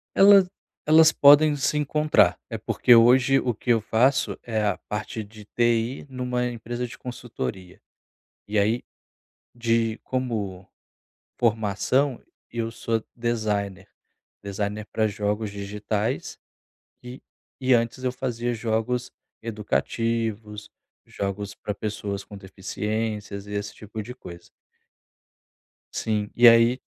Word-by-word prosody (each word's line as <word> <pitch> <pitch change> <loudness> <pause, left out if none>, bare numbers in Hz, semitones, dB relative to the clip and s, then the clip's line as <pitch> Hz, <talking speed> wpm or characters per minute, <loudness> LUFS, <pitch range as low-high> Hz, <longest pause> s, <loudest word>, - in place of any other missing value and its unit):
Ela 195 -1 +8 0.4
elas 160 +1 +7
podem 145 +1 +6
se 145 +2 0
encontrar, 150 - +3
eh, - - -4
porque 125 - +3
hoje 125 +3 +5
o 125 - -1
que 115 - -8
eu 115 - +4
faço 120 +6 +1
é 110 -2 -1
a 100 -3 0
parte 105 +1 -4
de 105 0 -14
TI 120 +4 0
numa 125 -1 -2
empresa 120 +1 -4
de - - -11
consultoria. 90 - -6 0.7
E 105 +1 -1
aí, 110 +4 +2 0.7
de 115 -1 0
como 105 -8 -3 0.7
formação 115 +4 +1 0.3
eu 115 -1 -2
sou 115 -1 -2
designer, 105 -5 -2 0.6
designer 105 +2 -3
pra 110 -1 +1
jogos 105 +1 -2
digitais 105 +3 -3 0.7
e 125 +2 -9 0.4
e 130 0 +3
antes 115 +2 -1
eu 125 - +1
fazia 120 -2 -3
jogos 115 +2 -1 0.3
educativos, 110 -1 -2 0.4
jogos 100 0 -4
pra 105 - -4
pessoas 100 -2 -4
com 100 - -12
deficiências 105 +1 -4
e - - -9
esse 100 0 -4
tipo 110 +1 -7
de 125 +3 -9
coisa. 85 -8 -12 1.5
Sim, 105 -2 -1
e 120 0 +7
aí 115 +2 +6
115 Hz, 120 wpm, -25 LUFS, 105-125 Hz, 1.5 s, Ela